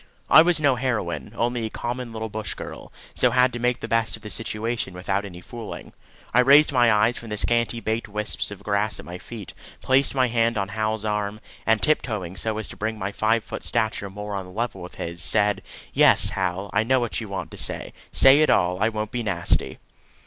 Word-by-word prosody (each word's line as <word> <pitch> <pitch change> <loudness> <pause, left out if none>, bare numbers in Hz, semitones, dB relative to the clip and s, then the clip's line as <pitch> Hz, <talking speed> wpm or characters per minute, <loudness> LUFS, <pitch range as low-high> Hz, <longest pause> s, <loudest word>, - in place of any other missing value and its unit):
I - - +10
was 170 -1 +3
no 140 -4 +3
heroine, 115 -7 -2
only 120 0 -1
a - - -7
common 120 +1 -5
little 110 0 -4
bush 110 0 -5
girl, - - -9 0.2
so 125 - +3
had 125 +1 +3
to 120 - -4
make 125 +1 0
the - - -4
best 115 -1 +1
of - - -15
the 105 - -7
situation 110 -3 -3
without 100 +2 -2
any 90 -3 -9
fooling. 115 +2 -9 0.4
I 120 - +5
raised 140 +5 +6
my 120 -3 +5
eyes 110 +3 +3
from 115 - -10
the 105 - -3
scanty 115 +1 +1
baked 110 +1 -2
wisps 105 0 -2
of 100 -2 -9
grass 105 +1 0
at - - -9
my 90 +1 -8
feet, 110 -2 -9 0.3
placed 135 +1 +2
my 130 -1 +4
hand 115 -1 +1
on 100 -1 -1
Hal's 110 0 -2
arm, 105 0 -2 0.3
and 115 -1 +3
tiptoeing 110 - 0
so 110 +2 -2
as 110 - -4
to - - -9
bring 110 +1 -2
my 100 0 -3
five 110 +2 +1
foot - - -7
stature 110 -2 -1
more 105 +1 -7
on 95 -2 -4
a - - -12
level 110 -2 -3
with 90 - -9
his, 85 +1 -5
said: 105 0 +2 0.3
"Yes, - - +6
Hal, 95 +1 -2
I 105 - +3
know 130 +4 +2
what 120 -1 -2
you 110 - -7
want 95 -4 -5
to - - -10
say. - - -3 0.2
Say 135 +3 +6
it 155 - +4
all. 90 +2 +2
I 110 - +3
won't 110 -1 -4
be 120 - -2
nasty." 95 -6 0
110 Hz, 220 wpm, -24 LUFS, 100-120 Hz, 0.4 s, I